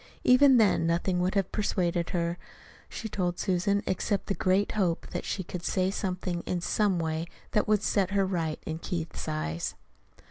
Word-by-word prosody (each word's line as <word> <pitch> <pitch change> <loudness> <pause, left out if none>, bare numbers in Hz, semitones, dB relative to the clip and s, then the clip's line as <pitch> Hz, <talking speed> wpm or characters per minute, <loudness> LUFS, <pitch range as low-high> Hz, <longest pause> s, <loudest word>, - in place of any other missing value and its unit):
Even 260 +1 +7
then 205 -7 +4
nothing 180 +2 +1
would 185 +3 0
have 195 -2 +1
persuaded 175 -4 0
her, 170 0 -1 0.5
she 225 - -5
told 180 -4 -1
Susan, 200 +2 +1
except 200 +2 -1
the 200 - -1
great 190 +1 +1
hope 180 -6 0
that - - -4
she 190 - -2
could 180 0 -6
say 185 +1 0
something, 180 -3 -2
in 180 - 0
some 195 +2 +1
way, 160 0 -2 0.2
that 210 - +1
would 210 -1 +2
set 195 -3 +2
her 200 -1 +2
right 165 -5 -2
in 160 0 -4
Keith's 170 -2 -4
eyes. 80 +2 -2
185 Hz, 175 wpm, -28 LUFS, 170-200 Hz, 0.5 s, Even